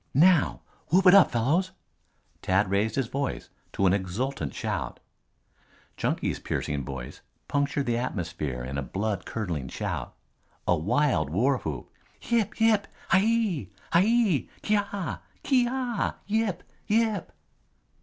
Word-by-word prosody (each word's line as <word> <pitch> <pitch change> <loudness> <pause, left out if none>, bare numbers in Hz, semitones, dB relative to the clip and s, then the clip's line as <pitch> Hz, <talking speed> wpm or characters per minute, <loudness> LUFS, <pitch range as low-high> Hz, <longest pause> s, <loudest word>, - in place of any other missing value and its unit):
"Now! 170 +1 +4 0.3
Whoop 185 +4 +3
it 180 - +9
up, 200 -3 +8
fellows!" 155 +11 +1 0.7
Tad 95 +1 +2
raised 105 +2 +1
his 135 - +1
voice 135 +3 -3 0.2
to 95 - +1
an 95 - +5
exultant 100 - -2
shout. - - -3 1.0
Chunky's - - -1
piercing 70 -2 -2
voice 65 -1 -7 0.3
punctured 140 0 0
the 120 -1 +1
atmosphere 75 - -3
in 70 +3 -3
a - - -1
blood 100 +6 -3
curdling 85 - -3
shout, - - -4 0.5
a 90 - +4
wild 105 - +1
warwhoop. 100 - 0 0.3
"Yip! 235 -2 0
Yip! 220 -3 +4 0.2
Hiyi! 195 - +2 0.2
Hiyi! 200 - +3
Kyaw! 205 -3 -1 0.2
Kyeeaw! 250 -3 +1
Yip! 215 -3 0 0.2
Yip!" 220 -3 +1
140 Hz, 115 wpm, -27 LUFS, -, 1.0 s, it